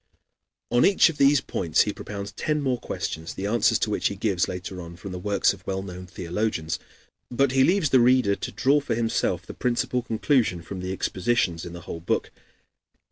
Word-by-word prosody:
On 120 0 +4
each 195 -3 +5
of 160 - -7
these 140 0 +5
points 85 -4 +1
he 105 - +1
propounds 100 -1 -6
ten 150 0 -1
more 130 -4 0
questions, 80 +1 -5
the 95 - -4
answers 110 +2 +3
to - - -1
which - - +1
he 100 - -3
gives 95 -3 0
later 90 0 -6
on 85 0 -9
from 95 +2 -8
the 90 - -5
works 100 +2 +2
of 95 -2 -14
well 95 0 -2
known 90 -1 -8
theologians. 90 -2 -2 0.5
But 135 +2 +2
he 130 0 +4
leaves 175 -3 +2
the 130 - +6
reader 120 -4 +4
to - - -5
draw 140 +3 +3
for 140 -5 -2
himself 115 0 0
the - - -8
principal 125 0 0
conclusion 115 - +1
from 95 +2 -7
the 90 +1 -4
expositions 95 -2 0
in 85 - -8
the 85 - -8
whole 85 - -7
book. 85 - -1
100 Hz, 200 wpm, -25 LUFS, 90-125 Hz, 0.5 s, the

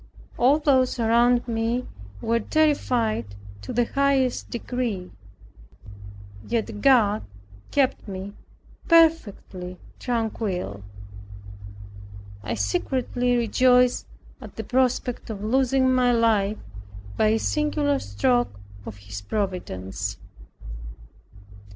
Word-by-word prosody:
All 265 +5 +4
those 265 -5 +2
around 235 +2 +3
me 230 +2 -1 0.4
were 230 +1 +1
terrified 230 - 0 0.3
to 100 - -7
the 240 0 +1
highest 275 -1 +1
degree, 235 -6 -3 1.4
yet 220 -3 -2
God 225 -6 +4 0.5
kept 270 -4 0
me 195 +1 -6 0.5
perfectly 220 - +2 0.2
tranquil. 215 - -3 1.6
I 110 +3 -3
secretly 245 - 0
rejoiced 250 +2 +3 0.3
at - - -11
the 220 - -5
prospect 250 0 0
of 205 -2 -6
losing 260 +3 +2
my 250 -1 +3
life 215 -3 +2 0.6
by 220 - +2
a 220 +1 +3
singular 295 +2 0
stroke 100 0 0 0.3
of 105 - -7
His 100 0 -8
providence. 175 - -4
230 Hz, 90 wpm, -24 LUFS, 195-255 Hz, 1.6 s, All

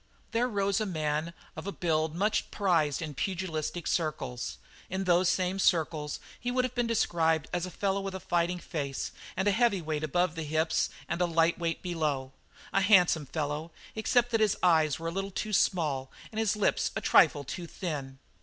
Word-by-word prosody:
There 235 +2 +2
rose 200 -2 0
a 215 - -1
man 155 -2 -1 0.2
of - - -7
a - - -1
build 160 -3 0
much 205 +4 +1
prized 165 -7 +1
in 155 -2 -5
pugilistic 175 0 -3
circles. 135 -7 -2 0.3
In 190 +1 -2
those 180 -1 +4
same 185 +1 0
circles 155 -5 +1 0.2
he 245 - -2
would 250 +1 +1
have 255 - -4
been 245 -1 0
described 165 -8 +1
as 175 0 -1
a - - -6
fellow 195 +2 -1
with 195 -1 -4
a - - -4
fighting 175 0 0
face 140 -6 -4 0.3
and 190 +2 +1
a - - +5
heavy 225 -1 +3
weight 155 -2 -3
above 175 +3 +1
the 165 - -5
hips 160 +1 +1 0.2
and 175 - -2
a 175 - +3
light 165 0 +2
weight 165 -1 -2
below 150 -7 -1 0.4
a 195 - +3
handsome 180 -7 +5
fellow, 150 +2 -3 0.2
except 240 +2 +2
that 225 -1 +2
his 215 -2 +3
eyes 160 -5 +4
were 165 +1 -3
a - - -5
little 195 +2 -3
too 210 +2 -4
small 150 -10 +1 0.2
and 220 - -4
his 220 -1 +2
lips 210 - +1
a - - -1
trifle 145 - +5
too 170 +6 -6
thin. 145 -8 -5
175 Hz, 190 wpm, -29 LUFS, 155-195 Hz, 0.4 s, a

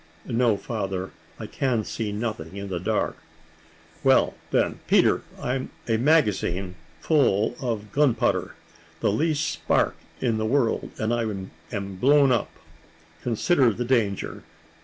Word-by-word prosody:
"No, 115 -3 +2
father; 95 -4 -4 0.3
I - - -5
can 125 -5 0
see 110 0 -3
nothing 105 -6 -4
in 100 0 -5
the 90 -2 -2
dark." - - -1 0.9
"Well, - - +4 0.2
then, - - +1
Peter, - - +4 0.2
I'm 130 +1 -2 0.2
a 115 -1 +2
magazine, 105 - +2 0.3
full 120 -7 +2
of 110 -5 -3
gun 140 -3 +3
powder; - - 0 0.4
the - - +2
least 155 +6 +1
spark - - +1 0.2
in 115 -4 0
the 110 - 0
world, 125 -1 +1
and 110 +1 0
I 120 - +1
am 100 -1 -5
blown 140 +5 +5
up. 120 - +1 0.7
Consider 125 +2 +3
the 120 +3 -3
danger. 115 -6 0
115 Hz, 135 wpm, -25 LUFS, 100-130 Hz, 0.9 s, blown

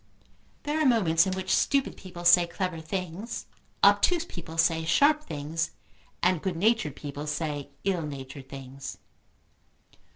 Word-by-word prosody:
There 300 +2 -1
are - - +3
moments 180 -9 +4
in 190 - 0
which 190 0 -1
stupid 275 -2 +1
people 175 -2 -10
say 175 0 +7
clever 170 -1 -3
things, 185 +6 -5 0.4
obtuse 345 -2 +5
people 165 - -9
say 165 0 +3
sharp 300 - +4
things, 155 - -3 0.5
and 180 -3 +3
good 190 -3 -2
natured 210 - +2
people 145 0 -6
say 150 -2 -3
ill 185 -3 +1
natured 140 -2 -7
things. 135 0 -8
170 Hz, 135 wpm, -28 LUFS, 150-195 Hz, 0.5 s, say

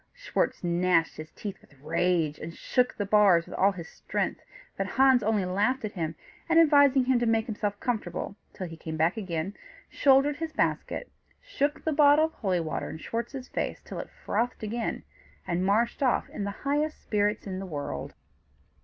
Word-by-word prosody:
Schwartz - - -1
gnashed 175 -1 +2
his 155 0 -8
teeth 205 -3 -7
with 140 - -23
rage, 165 0 0
and 165 +1 -7
shook 250 -1 +1
the 205 - -1
bars 200 -5 +5
with 180 - -10
all 195 +1 +3
his 175 -4 -8
strength; - - -3 0.3
but - - -2
Hans 265 -2 +4
only 210 -2 +1
laughed 210 +7 0
at 210 - -4
him, 165 -4 -3 0.3
and 330 0 +6
advising 285 -4 +6
him 255 -1 +3
to 240 - 0
make 225 -1 +2
himself 205 -2 -3
comfortable 205 -5 -3 0.2
till 185 - -6
he 165 -2 -8
came 160 0 -6
back 160 +3 +2
again, 185 -3 -3 0.4
shouldered 280 +1 +4
his 325 0 -4
basket, 400 - -1 0.3
shook 300 - -2
the 315 - 0
bottle 295 +1 +6
of 320 - -6
holy 190 -5 0
water 160 -1 -3
in - - -6
Schwartz's 245 - -5
face - - -3
till - - -6
it - - -6
frothed 245 0 -2
again, 230 +2 -3 0.4
and 175 +1 -1
marched 230 +6 +1
off 255 -3 +2
in 200 - -4
the - - -2 0.2
highest 295 +2 0
spirits 210 0 0
in 190 -2 -4
the 195 - -6
world. 145 - -5
210 Hz, 185 wpm, -28 LUFS, 175-265 Hz, 0.4 s, and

